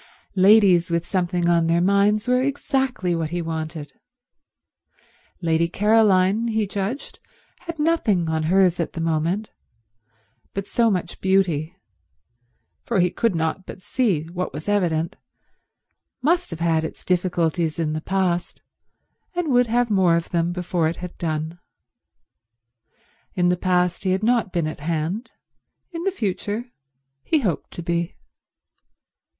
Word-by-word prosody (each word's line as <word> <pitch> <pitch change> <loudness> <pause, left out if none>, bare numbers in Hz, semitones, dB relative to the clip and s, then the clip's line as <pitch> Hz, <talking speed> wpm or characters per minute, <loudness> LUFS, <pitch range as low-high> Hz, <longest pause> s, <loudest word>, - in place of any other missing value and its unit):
Ladies 190 -3 +5
with 170 0 0
something 180 -2 0
on 170 -1 +3
their 165 +1 +3
minds 200 +4 +2
were 250 0 +3
exactly 265 -8 -1
what 165 -2 -1
he 175 +2 -3
wanted. 160 -2 -5 1.5
Lady 165 0 +2
Caroline, 210 +1 +3
he 220 -2 0
judged, 200 +7 -4 0.4
had 335 -1 -7
nothing 300 - +1
on 160 0 0
hers 185 -2 +3
at 170 - -2
the - - -5
moment, 165 +6 -1 1.0
but 195 -1 -2
so 230 +2 +2
much 180 -4 -3
beauty—for 180 -5 +1 1.3
he 180 0 +3
could 230 -4 0
not 165 +3 -2
but 185 - -10
see 200 - 0
what 180 +1 -3
was 155 +5 -8
evident—must 205 - -3
have 165 - -6
had 165 -1 +2
its 160 - -7
difficulties 170 -3 0
in 155 -2 -1
the 155 - -3
past 180 -1 -1 0.7
and 350 -3 -1
would 245 -2 +4
have 240 0 +1
more 185 -4 +4
of 170 0 -2
them 170 0 +1
before 175 -2 -1
it 165 - -2
had 180 -1 -8
done. 160 +1 -3 1.8
In 175 -1 +2
the 180 - +3
past 180 0 0
he 185 -1 +2
had 190 +3 -1
not 230 -3 +2
been 170 -3 0
at 155 - -5
hand; 165 - -2 0.6
in 340 0 -5
the 390 - +2
future 215 - -3 0.5
he 315 -3 +1
hoped 185 - -2
to 170 - -6
be. 170 0 -2
180 Hz, 135 wpm, -23 LUFS, 170-215 Hz, 1.8 s, Ladies